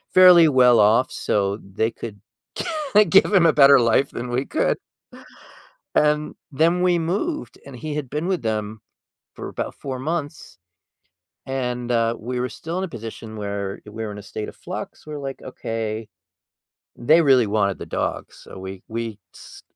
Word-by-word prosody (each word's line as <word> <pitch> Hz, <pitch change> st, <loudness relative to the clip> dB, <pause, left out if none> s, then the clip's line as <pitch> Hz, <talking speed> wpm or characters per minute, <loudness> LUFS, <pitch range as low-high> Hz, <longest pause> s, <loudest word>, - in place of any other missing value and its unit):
fairly 180 Hz, -3 st, +8 dB
well 125 Hz, -4 st, +5 dB
off 110 Hz, +5 st, +4 dB
so 100 Hz, 0 st, -1 dB
they 110 Hz, +3 st, -2 dB
could 105 Hz, -3 st, -8 dB, 0.9 s
give 195 Hz, -, +5 dB
him 180 Hz, -3 st, +5 dB
a 160 Hz, -, +5 dB
better 140 Hz, -2 st, +7 dB
life 125 Hz, +3 st, +2 dB
than 120 Hz, +1 st, -5 dB
we 125 Hz, +3 st, -1 dB
could. 315 Hz, -, 0 dB, 1.2 s
And 150 Hz, 0 st, +2 dB, 0.2 s
then 165 Hz, +5 st, +2 dB
we 175 Hz, -2 st, +3 dB
moved, 205 Hz, -, -3 dB
and 140 Hz, -2 st, -10 dB
he 150 Hz, +4 st, -5 dB
had 140 Hz, -5 st, -4 dB
been 150 Hz, +5 st, -3 dB
with 185 Hz, -7 st, 0 dB
them 110 Hz, -1 st, -3 dB, 0.5 s
for -, -, -7 dB
about -, -, -5 dB
4 130 Hz, -2 st, -6 dB
months, 150 Hz, -, -5 dB, 0.9 s
and, 125 Hz, -2 st, -3 dB
uh, 115 Hz, 0 st, +2 dB
we 125 Hz, +2 st, -4 dB
were 125 Hz, 0 st, -1 dB
still 165 Hz, +3 st, -6 dB
in 190 Hz, -, -1 dB
a -, -, -2 dB
position 115 Hz, -4 st, -8 dB
where 100 Hz, -1 st, -4 dB
we 110 Hz, +2 st, -7 dB
were 105 Hz, -, -4 dB
in 105 Hz, -, -8 dB
a -, -, -8 dB
state 105 Hz, +2 st, -6 dB
of -, -, -14 dB
flux. -, -, -8 dB
We're, 150 Hz, -1 st, -6 dB
like, 135 Hz, -1 st, -6 dB
"Okay.” 110 Hz, -3 st, -5 dB, 0.9 s
They 155 Hz, +8 st, +4 dB
really 130 Hz, -6 st, +5 dB
wanted 100 Hz, -2 st, 0 dB
the -, -, -7 dB
dog, -, -, -3 dB
so -, -, -13 dB
we 95 Hz, 0 st, -8 dB
we 115 Hz, -2 st, -4 dB, 0.2 s
s -, -, -13 dB
125 Hz, 170 wpm, -22 LUFS, 110-150 Hz, 1.2 s, fairly